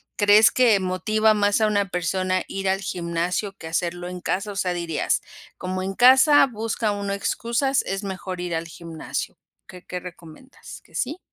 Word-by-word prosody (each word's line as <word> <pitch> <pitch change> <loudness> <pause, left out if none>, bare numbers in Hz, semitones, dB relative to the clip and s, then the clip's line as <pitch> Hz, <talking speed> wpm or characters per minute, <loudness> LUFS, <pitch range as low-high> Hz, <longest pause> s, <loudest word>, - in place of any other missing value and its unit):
crees 205 +1 +6
que 235 -5 +4
motiva 215 +4 +1
más 205 +1 +2
a 215 - +4
una 205 -2 0
persona 185 +1 -1
ir 195 0 -4
al 190 +1 0
gimnasio 180 +2 -2
que 160 - -9
hacerlo 175 +1 -2
en 180 -1 -7
casa? 195 +4 -2
O - - -13
sea, 185 -2 0
dirías: 170 -3 -1 0.4
"Como 185 0 -3
en 195 - -3
casa 265 +6 +6
busca 225 -1 -2
uno 200 -1 -3
excusas, 235 +6 0
es 195 +2 -4
mejor 190 -2 -5
ir 175 -1 -3
al 165 +1 -3
gimnasio". 165 -1 -6 0.3
¿Qué 180 -1 -13
qué 180 - -5
recomiendas? 180 - -12
¿Qué - - -20
sí? 295 +7 -2
195 Hz, 175 wpm, -23 LUFS, 180-215 Hz, 0.4 s, crees